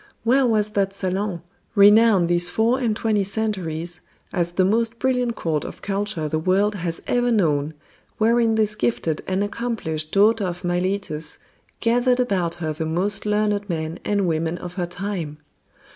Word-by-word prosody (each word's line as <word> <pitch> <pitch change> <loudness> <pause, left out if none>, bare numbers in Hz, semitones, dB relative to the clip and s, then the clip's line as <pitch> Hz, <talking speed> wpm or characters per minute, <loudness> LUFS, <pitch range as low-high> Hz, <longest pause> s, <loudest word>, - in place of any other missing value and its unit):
Where 255 +3 +3
was 215 -2 +1
that 195 -1 0
salon, 190 -2 -2 0.3
renowned 205 -2 +6
these 175 0 +3
four 230 +7 +2
and 230 -4 0
twenty 215 -2 +1
centuries 180 -5 -3 0.3
as 175 -2 -1
the 185 +1 +3
most 230 +3 +1
brilliant 250 -2 0
court 155 -6 -1
of - - -9
culture 195 -5 -2
the 155 +1 -1
world 195 +5 +2
has 175 -4 -4
ever 245 0 +1
known, 155 -8 +1 0.4
wherein 230 0 +3
this 215 -1 +2
gifted 190 -7 -1
and 190 +1 0
accomplished 205 -9 -3
daughter 210 +1 +4
of 175 +1 -5
Miletus 175 -3 -2 0.4
gathered 245 +2 +2
about 185 -8 0
her 160 -3 -3
the 160 +2 -4
most 195 +6 -1
learned 210 -1 0
men 160 -1 -3
and 200 -2 0
women 165 +1 -1
of 180 0 -8
her 180 -1 -2
time? 175 -4 -4
195 Hz, 160 wpm, -22 LUFS, 170-220 Hz, 0.4 s, renowned